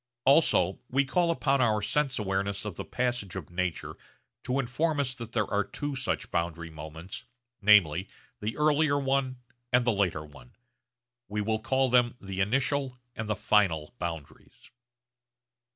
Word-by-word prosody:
Also 135 - +4
we 140 +2 +2
call 170 +5 +2
upon 140 -5 +2
our 110 -3 +3
sense 130 +6 0
awareness 100 0 -1
of 105 - -3
the - - -6
passage 125 -7 -2
of - - -7
nature 90 -1 -2 0.5
to 130 +1 -1
inform 145 +5 0
us 130 -3 0
that 115 -3 -9
there 105 -3 +1
are 100 0 +3
two 145 +5 -5
such 135 - -2
boundary 85 -1 -2
moments, 80 +3 -8 0.4
namely 95 -4 +5 0.3
the 110 +3 -3
earlier 150 -1 +3
one 135 -2 0 0.3
and 125 0 +4
the 120 - +3
later 90 -6 0
one. 75 +11 -16 0.7
We 105 0 -2
will 110 +1 0
call 130 +3 +1
them 120 -1 +4
the 95 -1 -4
initial 135 +4 0 0.2
and 110 -1 -5
the 105 - +1
final 95 -9 +2
boundaries. 80 -4 -7
110 Hz, 150 wpm, -28 LUFS, 95-135 Hz, 0.7 s, namely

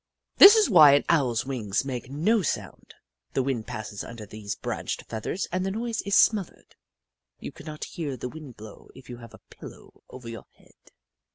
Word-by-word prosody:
This 405 +3 +10
is 435 -2 +4
why 155 -8 +7
an 145 - +2
Owl's 130 -9 +1
wings 120 -4 -2
make 125 -2 -6
no 190 +11 +1
sound; 160 - -5 0.4
the 135 - 0
wind 125 -5 -3
passes 110 -4 -6
under 115 -2 -9
these 105 -1 -7
branched - - -5
feathers 115 - -4
and 185 +1 -1
the 190 - -2
noise 225 +3 -3
is 200 0 -1
smothered. 205 -6 +1 0.6
You - - -7
cannot 155 0 -9
hear 145 -6 -5
the 125 - -5
wind 150 -4 -11
blow 105 -1 -13
if 130 -1 -13
you 120 - -8
have 115 -2 -13
a - - -19
pillow - - -14
over 125 -2 -11
your 115 -1 -9
head. - - -25
135 Hz, 185 wpm, -25 LUFS, 115-175 Hz, 0.6 s, This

